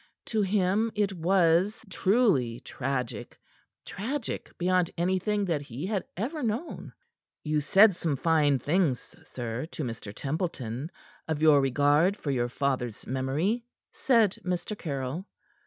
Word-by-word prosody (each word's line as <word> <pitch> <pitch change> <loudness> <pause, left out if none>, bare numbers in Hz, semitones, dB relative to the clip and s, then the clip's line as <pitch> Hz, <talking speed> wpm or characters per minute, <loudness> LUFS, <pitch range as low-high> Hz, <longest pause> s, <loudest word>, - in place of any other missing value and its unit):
To 220 - +3
him 200 +3 +1
it 205 -2 +1
was 180 +2 +2
truly 185 - +2
tragic, 130 -2 -4 0.5
tragic 245 +5 -4
beyond 180 -1 +2
anything 190 +4 +1
that 165 -6 0
he 140 +2 -6
had 195 -2 -1
ever 280 - -3
known. 235 +8 -3 0.5
"You 150 -1 +1
said 195 +6 +6
some 160 -4 -1
fine 150 -1 +3
things, 145 -1 0
sir, 120 +3 -5
to 165 - -6
Mr. 115 -4 -5
Templeton 135 - -3 0.4
of 160 -2 -1
your 150 -3 +7
regard 145 - +3
for 145 - -3
your 120 -2 0
father's 125 -4 -2
memory," 145 - -1 0.3
said 230 -7 +3
Mr. 180 +3 -2
Caryll. 145 +1 -4
165 Hz, 125 wpm, -28 LUFS, 135-195 Hz, 0.5 s, your